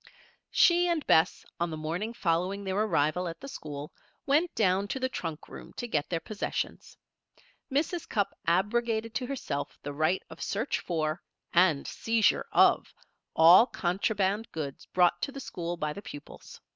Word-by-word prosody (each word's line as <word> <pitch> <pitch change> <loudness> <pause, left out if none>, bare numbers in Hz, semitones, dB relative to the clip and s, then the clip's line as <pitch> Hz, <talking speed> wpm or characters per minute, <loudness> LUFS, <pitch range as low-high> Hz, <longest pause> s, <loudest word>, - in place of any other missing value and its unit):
She 350 0 +4
and 335 -4 0
Bess, 160 - +3
on 170 0 0
the 160 - -5
morning 170 +8 -3
following 185 -1 -1
their 190 -1 -2
arrival 180 -4 +1
at 165 0 -6
the - - -9
school, 150 - -7 0.3
went 305 +5 +2
down 195 -1 +2
to 265 - -3
the 260 - +1
trunk 165 -9 -5
room - - -11
to 240 - -5
get 150 -9 -1
their 170 - -1
possessions. 205 +5 -4 0.7
Mrs. 310 +5 -1
Cupp 205 -2 0
abrogated 220 +5 +1
to 250 - -2
herself 245 - -4
the 145 - -5
right 155 +5 +1
of - - -12
search 220 +7 -1
for, 160 -1 -2 0.3
and 170 -5 +4
seizure 225 -1 +1
of, - - +4 0.4
all 175 +8 +8
contraband 200 +3 -1
goods 145 -4 -6
brought 175 -1 +3
to - - -2
the 275 - -8
school 175 -8 -5
by 150 -2 -2
the 200 - -8
pupils. 145 -6 -11
185 Hz, 160 wpm, -29 LUFS, 165-230 Hz, 0.7 s, all